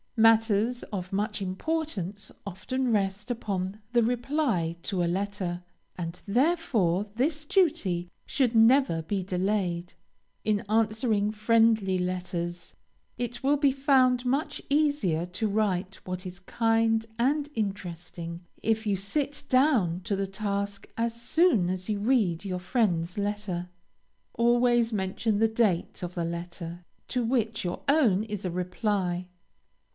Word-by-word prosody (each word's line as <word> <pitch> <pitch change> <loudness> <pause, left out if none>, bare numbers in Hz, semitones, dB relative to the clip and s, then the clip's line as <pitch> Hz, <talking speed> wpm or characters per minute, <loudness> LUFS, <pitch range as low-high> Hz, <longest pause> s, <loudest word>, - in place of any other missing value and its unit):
Matters 225 +1 +4
of 185 -2 -4
much 210 +1 -1
importance 205 - -3
often 240 +7 -2
rest 200 +1 0
upon 200 -4 -3
the 240 -1 +4
reply 240 - 0
to 185 -3 -1
a - - +2
letter, 180 -1 -2 0.3
and 170 0 -5
therefore 225 - +2
this 300 +5 0
duty 290 - +1 0.2
should 250 -4 +1
never 225 -6 +5
be 190 +3 -2
delayed. 180 -2 -1 0.5
In 210 -1 +1
answering 215 -1 +1
friendly 220 -3 +3
letters, 180 -1 -3 0.4
it 245 0 -3
will 285 +2 +3
be 280 -1 +4
found 260 -2 +3
much 285 +4 0
easier 285 - +2
to 185 +5 -2
write 195 -3 0
what 185 0 -5
is 180 -1 -7
kind 225 +3 +1
and 285 +5 +1
interesting, 175 -4 -4 0.2
if 220 0 0
you 200 - +2
sit 280 +10 -2
down 255 - +3
to 200 - -1
the 195 0 -1
task 200 0 -3
as 230 0 -1
soon 245 - +3
as 185 +2 -3
you 210 -1 0
read 205 -7 +2
your 185 -2 -3
friend's 180 -4 0
letter. 200 -4 -3 0.6
Always 240 0 +3
mention 205 +1 0
the 225 +2 +4
date 220 -7 0
of 180 0 -5
the 170 -2 -1
letter 170 0 -6 0.2
to 250 -2 0
which 230 -2 0
your 175 -1 -3
own 250 -10 +4
is 210 -3 -5
a 180 - -1
reply. 180 0 -1
210 Hz, 130 wpm, -28 LUFS, 180-240 Hz, 0.6 s, never